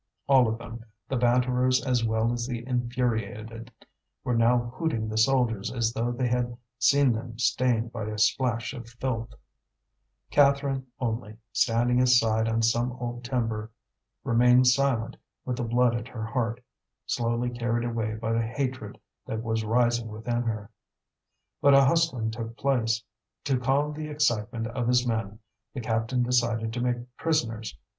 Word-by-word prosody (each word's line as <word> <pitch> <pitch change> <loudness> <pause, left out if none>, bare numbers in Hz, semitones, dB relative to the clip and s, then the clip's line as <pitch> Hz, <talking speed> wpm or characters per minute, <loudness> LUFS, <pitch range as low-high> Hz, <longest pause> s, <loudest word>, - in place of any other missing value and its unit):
All 135 -3 +5
of 110 0 -1
them, 115 0 -9 0.2
the 135 - -2
banterers 125 +1 +2
as 125 -3 +1
well 110 +1 +1
as 120 0 -3
the 120 -1 -5
infuriated, 115 -2 -2 0.5
were 125 - -1
now 120 +1 +2
hooting 130 -8 -1
the 110 0 -4
soldiers 115 -4 +2
as 115 -2 0
though 120 +1 -1
they 125 +1 -1
had 120 0 -1 0.2
seen 140 +2 +4
them 115 0 -6
stained 120 -1 +1
by 115 -3 -5
a 105 0 -4
splash 115 +2 +1
of 120 -4 -9
filth; 115 -1 -4 1.0
Catherine 140 -2 +3
only, 110 -3 -3 0.2
standing 120 +2 +2
aside 115 -3 +3
on 115 0 0
some 120 +2 +1
old 120 -1 -5
timber, 115 -4 -2 0.5
remained 125 +2 +5
silent 125 -3 +2 0.3
with 125 -1 -2
the 130 - -2
blood 120 +1 +2
at 120 0 -3
her 115 -3 -6
heart, 120 0 -2 0.4
slowly 120 +1 -1
carried 120 0 -1
away 110 -2 -2
by 110 +1 -3
the 115 - +2
hatred 120 -2 -4 0.3
that 110 0 -3
was 110 -1 -1
rising 120 +1 +1
within 115 +2 -3
her. 110 -4 -4 0.9
But 140 -1 +6
a 140 0 +7
hustling 135 -7 +1
took 115 +1 -6
place. 115 -5 +1 0.4
To 135 -3 +1
calm 140 +4 +1
the 155 0 -5
excitement 120 -6 0
of 120 +1 -3
his 125 0 +3
men, 110 -3 -2 0.4
the - - -3
captain 115 +2 0
decided 115 -2 +1
to 120 - -3
make 125 0 -3
prisoners. 115 - -1
120 Hz, 155 wpm, -27 LUFS, 115-125 Hz, 1.0 s, a